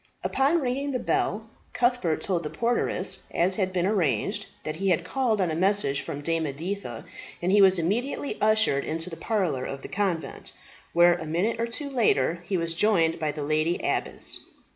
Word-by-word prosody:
Upon 285 +5 +2
ringing 270 +2 -1
the 265 - 0
bell, 220 -1 -1 0.3
Cuthbert 240 -10 +1
told 180 -4 0
the 150 - -4
porteress, 235 +6 0
as 180 +3 +1
had 190 -3 0
been 180 -1 0
arranged, 170 - 0 0.2
that 155 0 -4
he 195 +2 0
had 175 - +2
called 245 -6 0
on 180 -4 +1
a - - -2
message 185 -5 +1
from 145 - -6
Dame 165 +1 0
Editha, 145 - -5 0.3
and 180 +2 0
he 205 +1 +6
was 190 -1 +6
immediately 235 - -1
ushered 215 -10 +3
into 165 +3 -3
the - - -5
parlour 165 - -1
of 135 0 -6
the - - -5
convent, 175 -8 -3 0.4
where, 175 +1 +6
a 165 -2 -5
minute 195 +9 0
or 230 - 0
two 285 +5 -3
later, 175 - +1
he 190 - 0
was 165 -1 -1
joined 170 -3 +2
by 155 -2 0
the 150 0 -5
lady 155 +3 +1
abbess. - - -1
180 Hz, 185 wpm, -26 LUFS, 160-220 Hz, 0.4 s, he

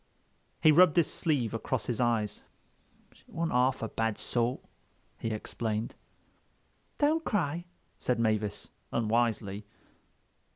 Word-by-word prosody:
He 155 - +8
rubbed 175 +1 +6
his 170 - +3
sleeve 140 -9 0
across 115 +1 -2
his 120 -1 -1
eyes. 115 -4 0 0.7
"She - - -23
wasn't 165 0 -2
half 125 0 +2
a - - 0
bad 115 0 -1
sort," 120 +1 0 0.6
he 115 - -2
explained. 110 0 -3 1.0
"Don't 310 +2 +2
cry," 175 - -1 0.3
said 125 -2 0
Mavis 110 -2 0 0.2
unwisely. 110 -3 0
120 Hz, 115 wpm, -30 LUFS, 110-150 Hz, 1.0 s, He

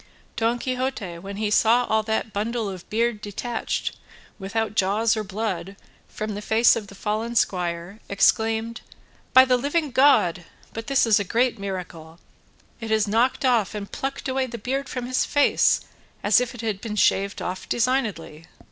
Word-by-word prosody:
Don 230 +1 +1
Quixote 250 -8 -3
when 195 +2 -8
he 210 -1 -1
saw 235 +3 +4
all 220 -1 +2
that 220 0 -2
bundle 220 +2 -2
of 185 -3 -8
beard 230 0 0
detached, 225 +3 -3 0.4
without 215 +2 -2
jaws 215 +3 +2
or 215 - -2
blood, 195 -2 -4 0.3
from 215 0 -5
the 205 - -5
face 225 +2 +4
of 215 -3 -5
the 200 - -13
fallen 220 +4 -3
squire, 180 0 -1
exclaimed: 225 +3 +1 0.5
"By 260 0 +8
the 255 -1 +3
living 290 +3 -1
God, 235 -10 +4 0.3
but 225 0 -6
this 275 -2 +3
is 220 -3 +4
a - - 0
great 235 +4 0
miracle! 175 -4 -7 0.6
it 225 -1 -6
has 220 -1 +2
knocked 235 +6 +1
off 230 -5 +2
and 200 -1 -6
plucked 270 0 -4
away 260 0 0
the 235 -1 -6
beard 265 +5 -3
from 250 -1 -4
his 255 +1 +1
face 290 -1 +3 0.4
as 205 +4 +5
if 250 0 -4
it 240 - -7
had 215 -4 -3
been 220 -2 -5
shaved 200 -1 +2
off 185 +1 -5
designedly." 215 - -1
220 Hz, 170 wpm, -24 LUFS, 200-245 Hz, 0.6 s, By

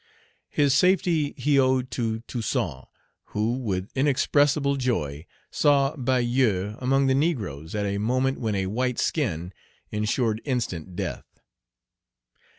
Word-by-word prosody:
His 145 -2 +2
safety 170 -2 +2
he 140 +2 +3
owed 130 -1 +2
to 115 -2 -2
Toussaint, 115 -2 -3 0.5
who, 110 +3 +1
with 100 -5 -3
inexpressible 140 +1 +2
joy, 80 - -2 0.2
saw 140 0 +3
Bayou 120 -6 +1
among 135 +2 +2
the 135 - +3
negroes 110 - -1
at 105 -1 -1
a 100 0 -1
moment 130 +5 0
when 110 -4 -1
a 95 -1 0
white 125 +5 -1
skin 90 - -1 0.4
insured 110 +1 0
instant 95 - -3
death. - - -6
125 Hz, 120 wpm, -25 LUFS, 105-135 Hz, 0.5 s, he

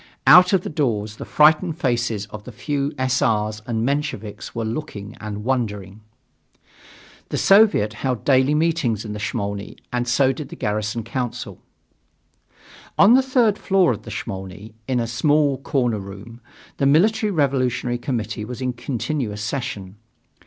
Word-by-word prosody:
Out 180 0 +8
of 190 -3 +3
the - - -4
doors 110 -8 -1
the - - -7
frightened 155 +2 +3
faces 120 - -1
of 105 -1 -8
the 125 - -9
few 140 +4 -2
S. 130 0 0
R.'s 105 -1 0
and 115 -1 -1
Mensheviks 140 -8 -3
were 115 -1 -2
looking 110 -4 -5
and 105 -1 -5
wondering. 105 -5 -2 1.3
The - - -2
Soviet 195 - +4
held 125 +1 -3
daily 135 +1 +4
meetings 150 -9 0
in 105 - -5
the 105 - -6
Smolny 100 -1 -4 0.2
and 120 0 -1
so 130 +2 +3
did 150 0 -8
the - - -8
Garrison 105 +2 -2
Council. 120 +1 -5 1.4
On 205 +4 +7
the 260 - +6
third 245 -6 +2
floor 190 -7 +3
of 110 -2 -4
the - - -11
Smolny, 95 +3 -7
in 130 -2 0
a 115 - 0
small 140 +4 +1
corner 125 -6 0
room, 100 +5 -10 0.4
the 135 - +2
Military 210 +9 +3
Revolutionary 130 -6 0
Committee 115 -5 -3
was 120 +3 -7
in 130 -1 -2
continuous 120 -3 -3
session. 110 -6 -4
125 Hz, 150 wpm, -22 LUFS, 105-145 Hz, 1.4 s, Out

